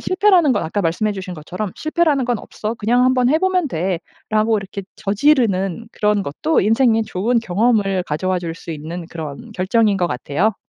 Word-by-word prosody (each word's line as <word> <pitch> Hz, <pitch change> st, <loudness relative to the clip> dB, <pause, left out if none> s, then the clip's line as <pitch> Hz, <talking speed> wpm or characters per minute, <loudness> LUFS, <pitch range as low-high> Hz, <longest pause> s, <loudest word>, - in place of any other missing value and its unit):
실패라는 370 Hz, -6 st, +3 dB
건 205 Hz, -, 0 dB
아까 185 Hz, +6 st, -2 dB
말씀해주신 185 Hz, +2 st, -2 dB
것처럼 180 Hz, +6 st, -5 dB
'실패라는 310 Hz, -4 st, +1 dB
건 245 Hz, -2 st, 0 dB
없어. 215 Hz, +2 st, -5 dB
그냥 240 Hz, +3 st, +2 dB
한번 255 Hz, -1 st, +3 dB
해보면 360 Hz, +2 st, +2 dB
돼.'라고 210 Hz, +5 st, -1 dB
이렇게 195 Hz, 0 st, -7 dB
저지르는 210 Hz, -, +1 dB
그런 210 Hz, -1 st, +1 dB
것도 300 Hz, -, 0 dB
인생에 225 Hz, +2 st, +3 dB
좋은 220 Hz, +4 st, 0 dB
경험을 200 Hz, -2 st, +1 dB
가져 155 Hz, +3 st, -3 dB
와 185 Hz, -1 st, +1 dB
줄 165 Hz, -2 st, -4 dB
수 165 Hz, -, -7 dB
있는 165 Hz, +3 st, -6 dB
그런 160 Hz, -, -7 dB
결정인 205 Hz, +2 st, +2 dB
것 175 Hz, -2 st, 0 dB
같아요. 155 Hz, -, -1 dB
210 Hz, 375 characters per minute, -19 LUFS, 180-245 Hz, -, 실패라는